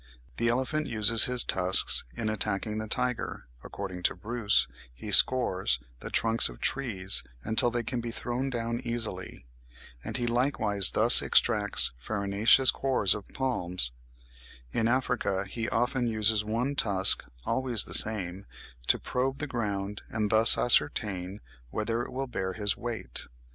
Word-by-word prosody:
The 115 - -1
elephant 130 +5 -2
uses 115 -1 +4
his 125 -1 +1
tusks 95 0 +3
in 110 - -4
attacking 110 0 -3
the 110 - -6
tiger; 125 +2 -3 0.2
according 95 -3 -8
to - - +1
Bruce, 115 -2 -1 0.2
he 80 - -10
scores 95 - +3 0.2
the - - -8
trunks 115 - +1
of - - -13
trees 95 - -1 0.2
until 110 +2 +2
they 120 0 -3
can 120 +1 -4
be 120 - -6
thrown 125 +3 -4
down 115 -1 -4
easily, 115 - -5 0.6
and - - -5
he 120 - -3
likewise 115 -6 +3
thus 115 +3 +6
extracts 105 -4 +3
the - - -22
farinaceous 100 - +3
cores 130 -8 0
of 105 - -9
palms; 90 - -1 0.8
in 115 - -1
Africa 120 -6 -1
he 115 +4 -5
often 120 +1 -1
uses 110 -1 +1
one 115 +6 -3
tusk, 95 -8 +3 0.2
always 125 -5 -1
the - - -11
same, 100 -3 +3 0.4
to - - +3
probe 130 +2 -3
the 150 - -4
ground 105 -6 -5
and 105 -2 -3
thus 110 +1 +5
ascertain 105 -6 +1 0.3
whether 115 - -3
it 120 - -7
will 135 +2 -4
bear 95 -7 -5
his 105 0 -2
weight. 120 -5 -4
110 Hz, 150 wpm, -27 LUFS, 100-120 Hz, 0.8 s, thus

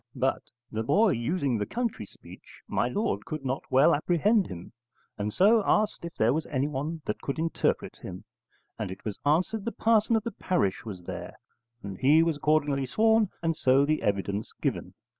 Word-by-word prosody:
But, - - 0 0.3
the 110 - -2
boy 205 - +3
using 130 - -1
the 105 - -2
country 230 - -3
speech, - - -15
my - - 0
lord 210 - -1
could 155 -3 -6
not 130 +1 -1
well 135 +6 +5
apprehend 180 +7 +2
him, 85 -1 -9 0.4
and 105 +1 -3
so 215 - +5
asked 210 -1 +1
if 170 -1 -7
there 115 +3 +3
was 155 +1 -2
anyone 145 +3 -2
that 105 - -3
could 140 - -3
interpret 165 +1 -1
him, - - -9 0.6
and 105 - -3
it 95 - -9
was 105 -3 -4
answered 185 +8 +1
the 235 - -2
parson 225 +1 +2
of 220 - +1
the 235 - -3
parish 110 - -1
was 95 -5 -7
there, - - -7 0.5
and 95 -2 -7
he 150 +5 +5
was 165 -3 0
accordingly 145 -2 +1
sworn 220 - +3
and 165 -1 +1
so 135 0 +3
the 155 +1 0
evidence 100 +1 -2
given. - - -3
150 Hz, 180 wpm, -28 LUFS, 115-190 Hz, 0.6 s, well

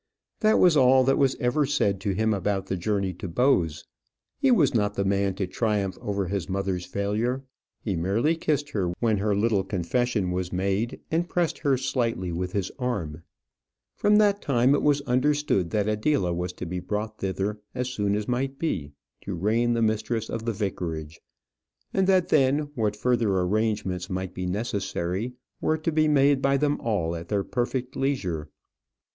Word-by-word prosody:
That 215 -1 +4
was 175 -3 +5
all 130 -1 +6
that 135 +1 +2
was 135 -2 +3
ever 130 +4 +2
said 100 -9 +1
to 100 0 -1
him 110 +2 +2
about 95 0 -1
the 95 - -2
journey 100 0 -1
to 90 - -7
Bowes. 85 - +1 0.5
He 275 -1 +3
was 170 - +4
not 105 -3 +1
the 100 - 0
man 100 0 +1
to 100 - -1
triumph 100 -1 -1
over 100 -2 -2
his 95 -3 -3
mother's 95 -2 -2
failure. 105 +7 -1 0.4
He 100 -4 -1
merely 100 - +1
kissed 145 -2 -1
her 90 -7 -1
when 110 -3 +2
her 105 0 +1
little 105 -1 +2
confession 100 +2 -1
was 90 -1 -2
made, 100 +5 -1
and 170 +2 0
pressed 175 -2 0
her 140 -3 +2
slightly 120 -8 -1
with 90 +2 -3
his 100 -2 -1
arm. 90 -11 -3 0.7
From 210 0 +3
that 205 -1 +4
time 130 0 +3
it 145 - +2
was 145 -1 +3
understood 130 - +1
that 105 +1 0
Adela 105 -3 +1
was 90 +1 -2
to 90 - -6
be 90 +1 -3
brought 105 +3 -4
thither, 100 +2 -2 0.2
as 125 0 -1
soon 105 -5 0
as 105 0 -3
might 135 +2 -1
be, 80 - -2 0.3
to 100 - -4
reign 115 +7 +1
the 115 -1 +1
mistress 110 +1 -1
of 115 - -4
the 115 - +1
vicarage; 85 -7 -4 0.7
and 190 -1 +2
that 185 -2 +3
then, 145 +1 +2
what 110 -5 0
further 115 -3 +1
arrangements 95 -2 -1
might 95 0 -3
be 90 0 -4
necessary, 100 +1 -2 0.3
were 155 - +1
to 160 +1 -1
be 155 0 +3
made 140 -2 +4
by 140 0 +3
them 145 +1 +1
all 90 -7 -1
at 85 0 -7
their 100 -2 0
perfect 125 +2 -2
leisure. 90 - -2
110 Hz, 180 wpm, -26 LUFS, 95-135 Hz, 0.7 s, all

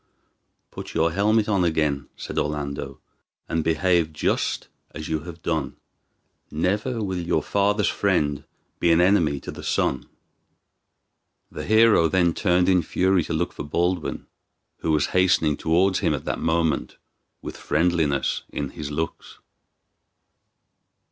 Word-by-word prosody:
"Put - - -8
your 80 +1 +2
helmet 105 +4 +2
on 100 -4 +2
again," 75 -4 0
said - - -4
Orlando, 70 -2 -4 0.5
"and 80 -1 -1
behave 85 0 +2
just 75 - -1 0.3
as 80 - -6
you 80 -1 0
have 85 +1 -11
done. 80 -5 -2 0.7
Never 105 +9 -1
will 95 -2 -2
your 85 -2 0
father's 100 +1 +1
friend 75 -8 0 0.4
be 85 - +3
an 85 - +4
enemy 85 -6 +3
to - - -7
the - - -9
son." 65 - -1 1.4
The - - -6
hero 110 -6 +5
then 85 0 +2
turned 90 -1 +2
in 90 -2 +4
fury 95 0 +1
to - - -4
look 85 +2 -1
for - - -6
Baldwin, 85 +3 -1 0.5
who - - -4
was 75 -2 +2
hastening 90 -5 +3
towards 90 +5 +2
him - - +1
at - - -7
that - - -2
moment, 80 -2 0 0.5
with - - -6
friendliness 80 -4 0
in 70 -2 -4
his 75 -2 -6
looks. 80 +2 -5
85 Hz, 135 wpm, -24 LUFS, 75-95 Hz, 1.4 s, hero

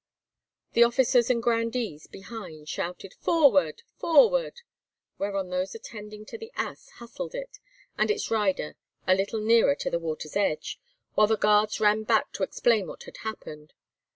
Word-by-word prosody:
The 235 - +3
officers 240 0 +3
and 235 -2 +1
grandees 230 -8 -1
behind 185 -8 -10
shouted, 180 +4 -5
"Forward!—forward!" 330 - +3 0.6
whereon 195 -2 -2
those 185 +2 -2
attending 210 -1 -9
to 460 - -9
the 450 +1 -9
ass - - -5
hustled 240 - -7
it - - -7 0.4
and - - +2
its 425 - -1
rider 205 -8 0 0.3
a 185 - +5
little 200 +3 -1
nearer 225 -9 +4
to - - -3
the 170 - 0
water's 155 -2 -5
edge, 200 -6 -1 0.3
while 215 - +5
the 220 0 +2
guards 210 +1 +3
ran 215 0 +3
back 220 0 +1
to - - -8
explain 210 +1 +2
what - - -9
had - - -12
happened. 155 -8 -8
215 Hz, 150 wpm, -27 LUFS, 190-235 Hz, 0.6 s, a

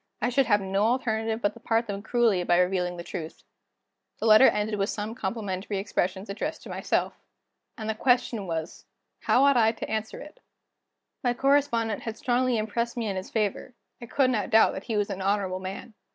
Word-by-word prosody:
I 240 - 0
should 260 +1 +2
have 205 -3 +3
no 195 +1 -1
alternative 225 -2 0
but 205 - +1
to 230 - -14
part 230 0 0
them 200 -2 -5
cruelly 220 -5 +2
by 175 0 +3
revealing 180 -1 +1
the 170 - -6
truth." 165 -3 -7 0.7
The - - -4
letter 220 +4 +8
ended 210 0 0
with 195 - 0
some 215 +1 -4
complimentary 200 -3 -4
expressions 190 0 -2
addressed 200 - -4
to - - -10
myself. - - -1 0.6
And 220 - -5
the 220 - 0
question 240 -3 +1
was: 165 -1 -5 0.3
how 260 - +3
ought 280 -2 +5
I 225 -1 +4
to 225 - -6
answer 220 0 -3
it? 300 +12 -12 0.8
My 245 -1 +1
correspondent 265 -5 +1
had 225 -1 -6
strongly 250 -1 +1
impressed 235 +3 -2
me 225 -3 -1
in 195 - -2
his 185 +1 -5
favor; 220 +3 -2 0.3
I 235 - -8
could 260 +1 +2
not 215 -5 -1
doubt 220 0 +5
that - - -7
he 225 -3 -2
was 205 -1 0
an 190 - -5
honorable 190 -1 0
man. 190 +5 -7
220 Hz, 195 wpm, -27 LUFS, 195-235 Hz, 0.8 s, letter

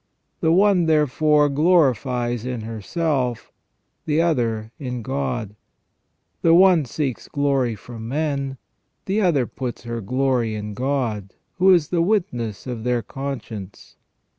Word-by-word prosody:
The 160 - +2
one, 185 -1 +4
therefore, 150 0 +3
glories 130 - +2
in 125 -2 -4
herself, 125 - -2 0.6
the 155 0 +2
other 115 -9 0
in 125 -4 -4
God; 130 -6 -3 0.9
the 165 0 +5
one 180 -4 +6
seeks 135 0 -3
glory 135 -5 0
from 115 +1 -9
men, 140 -1 -2 0.5
the 200 +3 0
other 160 -10 +2
puts 125 0 -6
her 115 -1 -4
glory 125 0 0
in 105 0 -5
God, 120 -5 -2 0.2
who 190 +1 +6
is 170 -5 +4
the 175 -2 +1
witness 125 - -1
of 120 -4 -5
their 125 -1 0
conscience. 125 -8 -7
130 Hz, 125 wpm, -22 LUFS, 115-155 Hz, 0.9 s, one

